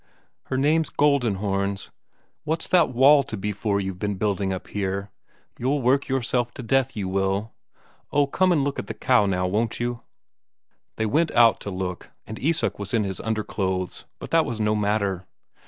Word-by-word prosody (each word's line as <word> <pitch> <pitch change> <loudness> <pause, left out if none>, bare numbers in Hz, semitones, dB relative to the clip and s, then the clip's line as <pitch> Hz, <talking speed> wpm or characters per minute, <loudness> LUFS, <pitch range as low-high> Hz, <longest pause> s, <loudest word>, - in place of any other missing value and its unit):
"Her 130 - -2
name's 155 +3 +2
Goldenhorns. 100 -8 0 0.5
What's 160 +1 -1
that 175 -3 +4
wall 135 +4 +6
to 115 -5 -6
be 105 +2 -2
for 100 0 -1
you've 95 -2 -4
been 105 0 -1
building 100 -1 -1
up 95 0 -5
here? 100 0 -3 0.5
You'll 135 +2 0
work 135 +3 +2
yourself 125 -2 0
to 130 - -7
death, 130 +2 +1
you 100 -2 -2
will. 95 +3 -1 0.6
Oh, 145 0 +3
come 185 +6 +2
and 155 -5 +3
look 140 0 -2
at - - -5
the - - -5
cow, 120 -6 +3
now, 90 -1 0
won't 110 +5 -1
you?" 120 0 -2 0.9
They 110 - -1
went 155 +9 +2
out 115 -2 +5
to - - -6
look, 90 -2 -5 0.2
and 110 - -8
Isak 160 -4 0
was 100 +3 -2
in 110 - +2
his 95 -2 -4
underclothes, 95 -4 -2
but - - -9
that 165 -1 +4
was 115 -6 -4
no 105 0 +2
matter. 100 -3 -1
110 Hz, 180 wpm, -24 LUFS, 100-135 Hz, 0.9 s, wall